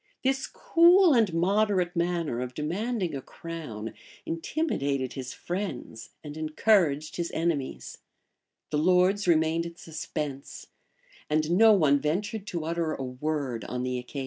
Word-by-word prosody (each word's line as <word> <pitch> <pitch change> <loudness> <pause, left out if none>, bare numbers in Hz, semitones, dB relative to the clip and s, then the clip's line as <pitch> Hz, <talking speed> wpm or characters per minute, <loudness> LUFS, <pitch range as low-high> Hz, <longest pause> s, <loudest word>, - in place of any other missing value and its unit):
[] - - -47
This 270 0 +1
cool 345 0 +5
and 225 -6 +3
moderate 185 +1 +1
manner 170 -7 -1
of 125 0 -5
demanding 185 +4 -2
a 135 - -4
crown 150 -10 -7 0.3
intimidated 145 - -2
his 130 -2 -6
friends 145 - -5
and 150 -1 -8
encouraged 155 -1 +1
his 170 -1 -2
enemies: 160 -5 -2 0.7
the 150 - +1
lords 185 +4 +3
remained 165 0 +2
in 170 - -10
suspense;[] 150 -4 -6 0.6
and 155 +1 +1
no 220 +5 +7
one 150 -7 +4
ventured 200 +8 -2
to 170 -4 -3
utter 165 -1 -1
a 135 - -5
word 130 -2 -3
on 125 0 -3
the 125 0 -2
occasion. 125 +3 -7
165 Hz, 140 wpm, -27 LUFS, 140-185 Hz, 0.7 s, no